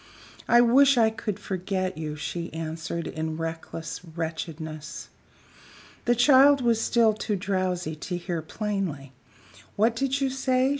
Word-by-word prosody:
"I 240 Hz, 0 st, +6 dB
wish 265 Hz, +3 st, +5 dB
I 225 Hz, -2 st, +5 dB
could 220 Hz, -3 st, -4 dB
forget 185 Hz, 0 st, -2 dB
you," 155 Hz, -1 st, -4 dB
she 170 Hz, +3 st, -5 dB
answered, 160 Hz, +1 st, -4 dB
in 160 Hz, 0 st, -4 dB
reckless 165 Hz, 0 st, -5 dB
wretchedness. 160 Hz, -2 st, -6 dB, 1.0 s
The 240 Hz, -, +3 dB
child 275 Hz, +3 st, +6 dB
was 235 Hz, -3 st, +2 dB
still 230 Hz, -2 st, +3 dB
too 210 Hz, 0 st, -2 dB
drowsy 185 Hz, -4 st, -1 dB
to 175 Hz, +3 st, -4 dB
hear 175 Hz, -2 st, -3 dB
plainly. 175 Hz, -7 st, -3 dB, 0.6 s
"What 225 Hz, +3 st, +2 dB
did 270 Hz, +3 st, 0 dB
you 270 Hz, -1 st, 0 dB
say?" 260 Hz, 0 st, +1 dB
185 Hz, 135 wpm, -26 LUFS, 160-235 Hz, 1.0 s, I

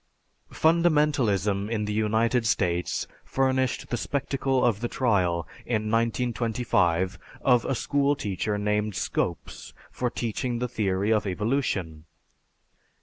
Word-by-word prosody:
Fundamentalism 145 Hz, -, +2 dB
in 110 Hz, -2 st, -1 dB
the 105 Hz, -, -2 dB
United 110 Hz, +2 st, +1 dB
States 90 Hz, -3 st, 0 dB, 0.2 s
furnished 130 Hz, -1 st, 0 dB
the 120 Hz, -, -1 dB
spectacle 135 Hz, 0 st, 0 dB
of 115 Hz, -4 st, +2 dB
the 120 Hz, -, -2 dB
trial, 90 Hz, -10 st, +1 dB, 0.2 s
in 110 Hz, -2 st, -1 dB
1925, 115 Hz, -6 st, +1 dB, 0.2 s
of 125 Hz, -4 st, +4 dB
a 135 Hz, -, 0 dB
school 140 Hz, +4 st, +1 dB
teacher 105 Hz, -2 st, -2 dB
named 105 Hz, 0 st, 0 dB
Scopes, -, -, -3 dB, 0.2 s
for 125 Hz, -, -1 dB
teaching 120 Hz, +1 st, -2 dB
the 125 Hz, +1 st, -1 dB
theory 105 Hz, -2 st, 0 dB
of 105 Hz, -1 st, 0 dB
evolution. 95 Hz, -, -1 dB
110 Hz, 115 wpm, -26 LUFS, 100-125 Hz, 0.2 s, of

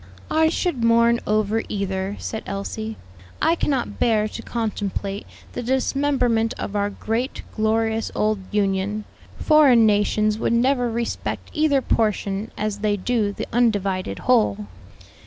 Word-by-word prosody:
"I 315 Hz, 0 st, +4 dB
should 335 Hz, -7 st, -1 dB
mourn 235 Hz, 0 st, +4 dB
over 215 Hz, +1 st, +1 dB
either," 195 Hz, -1 st, -2 dB
said 220 Hz, -, -5 dB
Elsie, 215 Hz, +2 st, -4 dB, 0.4 s
"I 320 Hz, -, +3 dB
cannot 275 Hz, -6 st, -1 dB
bear 215 Hz, -2 st, +2 dB
to -, -, -7 dB
contemplate 205 Hz, -3 st, -3 dB, 0.3 s
the -, -, -4 dB
dismemberment 255 Hz, -2 st, +1 dB
of 210 Hz, -, -5 dB
our 205 Hz, 0 st, +1 dB
great, 225 Hz, +5 st, -3 dB
glorious 220 Hz, +1 st, 0 dB
old 215 Hz, -1 st, +1 dB
Union. 205 Hz, 0 st, 0 dB, 0.3 s
Foreign 280 Hz, -7 st, +5 dB
nations 210 Hz, 0 st, +2 dB
would 230 Hz, -, +1 dB
never 245 Hz, +1 st, +2 dB
respect 235 Hz, +1 st, -3 dB
either 300 Hz, -4 st, +2 dB
portion 210 Hz, -1 st, 0 dB
as 210 Hz, -1 st, -2 dB
they 205 Hz, -1 st, +1 dB
do 215 Hz, 0 st, 0 dB
the -, -, -5 dB
undivided 200 Hz, -, +1 dB
whole." 105 Hz, 0 st, +2 dB
220 Hz, 130 wpm, -22 LUFS, 205-240 Hz, 0.4 s, Foreign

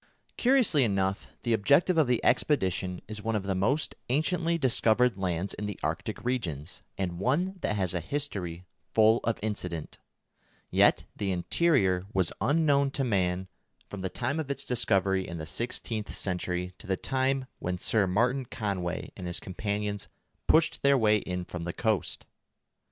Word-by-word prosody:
Curiously 245 Hz, -, +4 dB
enough 95 Hz, -3 st, 0 dB, 0.2 s
the 120 Hz, -, +1 dB
objective 140 Hz, -, +4 dB
of 160 Hz, -4 st, +4 dB
the 125 Hz, -1 st, +1 dB
expedition 95 Hz, -, +1 dB
is 105 Hz, 0 st, -5 dB
one 110 Hz, +1 st, -1 dB
of 105 Hz, -, -1 dB
the 95 Hz, 0 st, -1 dB
most 110 Hz, +11 st, 0 dB, 0.2 s
anciently 165 Hz, +5 st, +1 dB
discovered 125 Hz, -4 st, +3 dB
lands 95 Hz, 0 st, -1 dB
in 105 Hz, -, -4 dB
the 105 Hz, -, -6 dB
Arctic -, -, -3 dB
regions, 90 Hz, -, -3 dB, 0.2 s
and 90 Hz, -3 st, -2 dB
one 175 Hz, -, 0 dB
that -, -, 0 dB
has 95 Hz, -3 st, 0 dB
a 90 Hz, -, 0 dB
history 90 Hz, -, -3 dB, 0.3 s
full 110 Hz, +1 st, +6 dB
of 115 Hz, 0 st, 0 dB
incident; 90 Hz, -7 st, -4 dB, 0.7 s
yet -, -, +4 dB
the 100 Hz, -2 st, -1 dB
interior 95 Hz, -, +2 dB
was 95 Hz, -3 st, +2 dB
unknown 145 Hz, -2 st, +3 dB
to 135 Hz, 0 st, -2 dB
man 95 Hz, -5 st, 0 dB, 0.4 s
from 100 Hz, -, -6 dB
the 95 Hz, -, -2 dB
time 140 Hz, -, -2 dB
of 150 Hz, -3 st, -4 dB
its 140 Hz, 0 st, -2 dB
discovery 95 Hz, -7 st, +1 dB
in 85 Hz, -, -5 dB
the 80 Hz, -, -5 dB
sixteenth 115 Hz, +2 st, -3 dB
century 90 Hz, -1 st, -2 dB
to -, -, -11 dB
the 95 Hz, -1 st, 0 dB
time 130 Hz, +2 st, 0 dB
when 90 Hz, 0 st, -2 dB
Sir 100 Hz, +2 st, +2 dB
Martin 125 Hz, +8 st, +1 dB
Conway 95 Hz, -7 st, -3 dB
and 90 Hz, -, -6 dB
his 85 Hz, -, -1 dB
companions 105 Hz, +1 st, -3 dB, 0.4 s
pushed 160 Hz, +1 st, +3 dB
their 140 Hz, 0 st, +5 dB
way 110 Hz, -3 st, +4 dB
in 90 Hz, -2 st, -4 dB
from 90 Hz, -1 st, -6 dB
the 85 Hz, 0 st, -3 dB
coast. 110 Hz, -6 st, -1 dB
105 Hz, 160 wpm, -29 LUFS, 95-130 Hz, 0.7 s, full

